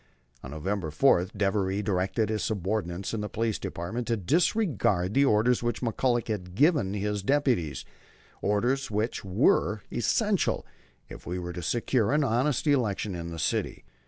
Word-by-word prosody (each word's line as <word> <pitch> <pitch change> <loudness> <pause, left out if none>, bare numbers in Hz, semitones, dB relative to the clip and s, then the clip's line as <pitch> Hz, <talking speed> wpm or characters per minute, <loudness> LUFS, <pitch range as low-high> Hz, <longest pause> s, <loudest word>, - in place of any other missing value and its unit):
On 65 - -7
November 85 +4 -3
4 90 - +4
Devery 95 0 -1
directed 100 +3 0
his 110 -1 -1
subordinates 100 -3 -2
in 110 - -2
the 105 - -4
Police 110 +1 -1
Department 110 +8 -4
to 115 -1 +1
disregard 120 - +1
the 140 +3 +4
orders 120 0 +3
which 120 0 -2
McCullagh 120 +1 0
had 90 -5 -4
given 145 - +3
to 105 - -2
his 105 0 -1
deputies, 120 - 0 0.6
orders 120 +7 0
which 110 +2 -2
were 95 +1 +2
essential 205 - +1 0.4
if - - -11
we 90 +1 -3
were 90 -1 -5
to 90 - -5
secure 115 +2 +1
an 150 0 +3
honest 130 +3 +1
election 115 -8 +1
in 85 -1 -5
the 85 - -7
city. 80 - -2
105 Hz, 160 wpm, -27 LUFS, 95-125 Hz, 0.6 s, 4